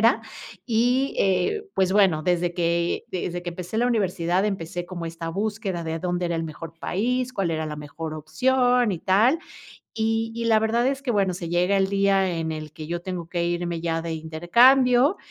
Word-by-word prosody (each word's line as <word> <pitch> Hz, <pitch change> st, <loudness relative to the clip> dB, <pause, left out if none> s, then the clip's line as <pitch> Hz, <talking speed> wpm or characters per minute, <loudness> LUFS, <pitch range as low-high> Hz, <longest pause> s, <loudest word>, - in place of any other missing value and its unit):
carrera 230 Hz, +4 st, +4 dB, 0.5 s
y, 245 Hz, +4 st, +1 dB
eh, 195 Hz, -, +1 dB
pues 190 Hz, 0 st, +2 dB
bueno, 190 Hz, -7 st, +4 dB
desde 175 Hz, -1 st, +1 dB
que 170 Hz, 0 st, 0 dB
desde 175 Hz, -1 st, -4 dB
que 175 Hz, -, -4 dB
empecé 180 Hz, +5 st, -5 dB
la 245 Hz, -, +2 dB
universidad, 190 Hz, -5 st, +1 dB
empecé 175 Hz, -3 st, -3 dB
como 175 Hz, -2 st, -6 dB
esta 165 Hz, 0 st, -6 dB
búsqueda, 200 Hz, -2 st, -3 dB
de 160 Hz, 0 st, -3 dB
dónde 180 Hz, 0 st, -1 dB
era 170 Hz, -, -1 dB
el 165 Hz, -, -2 dB
mejor 160 Hz, +1 st, -8 dB
país, 250 Hz, +8 st, -1 dB
cuál 195 Hz, -8 st, -1 dB
era 160 Hz, -1 st, -2 dB
la 150 Hz, -1 st, -5 dB
mejor 155 Hz, +2 st, -6 dB
opción, 245 Hz, -, +2 dB
y 170 Hz, -, -3 dB
tal, 220 Hz, -, +3 dB, 0.6 s
y 225 Hz, 0 st, 0 dB
y 235 Hz, 0 st, -3 dB
la 225 Hz, -1 st, +4 dB
verdad 230 Hz, +2 st, +1 dB
es 275 Hz, +1 st, -1 dB
que, 255 Hz, -, -2 dB
bueno, 195 Hz, -4 st, +2 dB
se 170 Hz, -2 st, -6 dB
llega 180 Hz, +3 st, +2 dB
el 190 Hz, 0 st, +2 dB
día, 195 Hz, -2 st, +2 dB
en 160 Hz, -1 st, -2 dB
el 155 Hz, -1 st, -7 dB
que 155 Hz, -1 st, -8 dB
yo 170 Hz, +2 st, -3 dB
tengo 180 Hz, -3 st, -5 dB
que 170 Hz, 0 st, -1 dB
irme 175 Hz, -1 st, -2 dB
ya 165 Hz, -1 st, -1 dB
de 165 Hz, -1 st, -4 dB
intercambio 245 Hz, -, +4 dB
180 Hz, 195 wpm, -24 LUFS, 170-225 Hz, 0.6 s, carrera